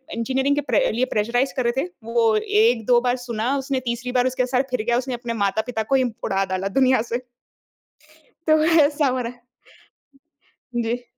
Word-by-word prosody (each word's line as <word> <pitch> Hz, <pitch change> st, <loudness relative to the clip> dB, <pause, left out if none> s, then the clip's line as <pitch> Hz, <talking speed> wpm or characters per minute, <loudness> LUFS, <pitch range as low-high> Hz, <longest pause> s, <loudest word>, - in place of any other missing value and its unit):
Engineering 265 Hz, +4 st, 0 dB
के 290 Hz, -, 0 dB
pray -, -, +1 dB
लिए 245 Hz, +3 st, 0 dB
pressurise 245 Hz, +5 st, 0 dB
कर 255 Hz, -, +1 dB
रहे 240 Hz, +3 st, +1 dB
थे, -, -, -4 dB, 0.2 s
वो 230 Hz, -1 st, +2 dB
1-2 225 Hz, +3 st, +3 dB
बार 245 Hz, 0 st, +1 dB
सुना 235 Hz, +3 st, -1 dB
उसने 270 Hz, -1 st, -2 dB
तीसरी 235 Hz, +1 st, -3 dB
बार 250 Hz, 0 st, +2 dB
उसके 255 Hz, 0 st, 0 dB
सर 250 Hz, 0 st, +1 dB
फिर 250 Hz, -4 st, -1 dB
गया 240 Hz, 0 st, +3 dB
उसने 255 Hz, +1 st, -3 dB
अपने 240 Hz, -1 st, -4 dB
माता-पिता 220 Hz, +3 st, -1 dB
को 245 Hz, +5 st, 0 dB
ही 260 Hz, -, +3 dB, 0.2 s
उड़ा 195 Hz, 0 st, 0 dB
डाला 190 Hz, +1 st, -2 dB
दुनिया 260 Hz, -3 st, +4 dB
से। 240 Hz, +2 st, -1 dB, 1.3 s
तो 310 Hz, 0 st, +4 dB
ऐसा 295 Hz, -2 st, +4 dB
हो 255 Hz, 0 st, 0 dB
रहा 240 Hz, 0 st, -4 dB
है। 245 Hz, -, -25 dB, 1.3 s
जी। 240 Hz, +1 st, -1 dB
245 Hz, 185 wpm, -22 LUFS, 230-260 Hz, 1.3 s, दुनिया